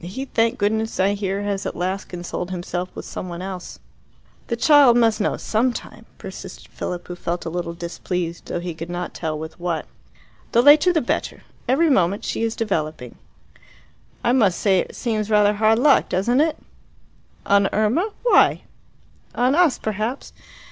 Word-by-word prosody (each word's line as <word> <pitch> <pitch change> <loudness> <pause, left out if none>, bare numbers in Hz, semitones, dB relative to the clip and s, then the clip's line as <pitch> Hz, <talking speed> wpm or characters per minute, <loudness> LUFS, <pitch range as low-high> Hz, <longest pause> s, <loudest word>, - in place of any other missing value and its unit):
He, 195 +10 -5
thank 230 -3 +1
goodness, 220 +2 -1
I 195 +2 +3
hear, 200 0 -2
has 200 -1 -2
at - - -5
last 185 +3 -2
consoled 175 0 -5
himself 180 0 -4
with - - -7
someone 175 0 -6
else." 185 -2 -7 0.7
"The 235 - -1
child 275 -1 +6
must 225 -2 +3
know - - 0
some 235 +4 +1
time," 225 -1 -9
persisted 190 -1 -10
Philip, 175 -1 -5
who 180 - -6
felt 175 0 -4
a 165 - -4
little 170 -1 -4
displeased, 170 0 -4
though - - -3
he 175 0 -5
could 165 +2 -8
not 175 0 -4
tell 155 -2 -3
with 160 +3 -8
what. 170 -2 -2 0.7
"The 235 - +5
later 300 +5 +7
the 325 -3 +1
better. 240 - -3 0.2
Every 300 +5 +3
moment 190 -4 +1
she - - -2
is 225 0 -1
developing." 155 - -3 1.1
"I 240 - +2
must 215 -9 +3
say 195 -3 +3
it - - -4
seems 215 -3 -2
rather 210 -1 +4
hard 215 +1 +3
luck, 275 +3 +4
doesn't 235 +9 +2
it?" 315 0 +1 0.9
"On 200 -1 +3
Irma? 235 - +1
Why?" - - +4 0.7
"On 250 +2 +2
us, 335 -3 +3
perhaps. 220 +5 -4
205 Hz, 170 wpm, -22 LUFS, 180-235 Hz, 1.1 s, later